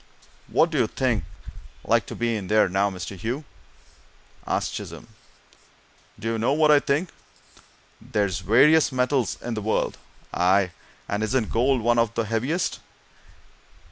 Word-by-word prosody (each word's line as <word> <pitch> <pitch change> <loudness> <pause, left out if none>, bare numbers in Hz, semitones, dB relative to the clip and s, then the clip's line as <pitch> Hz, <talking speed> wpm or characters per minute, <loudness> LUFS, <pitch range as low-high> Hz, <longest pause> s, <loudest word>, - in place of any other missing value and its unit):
"What 165 - +2
do 155 - 0
you 120 - +3
think's 120 -3 -1 0.6
like - - +1
to - - -7
be 115 -1 -1
in 100 -4 -5
there, 105 +1 +4
now, 95 +2 +1
Mr. 95 0 -7
Hugh?" 120 - -4 1.0
asked - - -1
Chisholm. - - -8 1.1
"Do 115 - -6
you 115 0 -1
know 120 +5 +2
what 155 0 +4
I 150 - +7
think? 145 +6 -1 0.9
There's 100 -3 -1
various 135 - +5
heavy 130 - -10
metals 125 0 +1
in 120 - -3
the 110 - -3
world 110 +2 -1 0.3
aye, 95 +1 +3 0.4
and 100 +1 -2
isn't 110 +1 0
gold 125 +2 +2
one 120 +1 +2
of 115 -1 +1
the 115 - +1
heaviest? 120 - -1
115 Hz, 150 wpm, -24 LUFS, 105-135 Hz, 1.1 s, I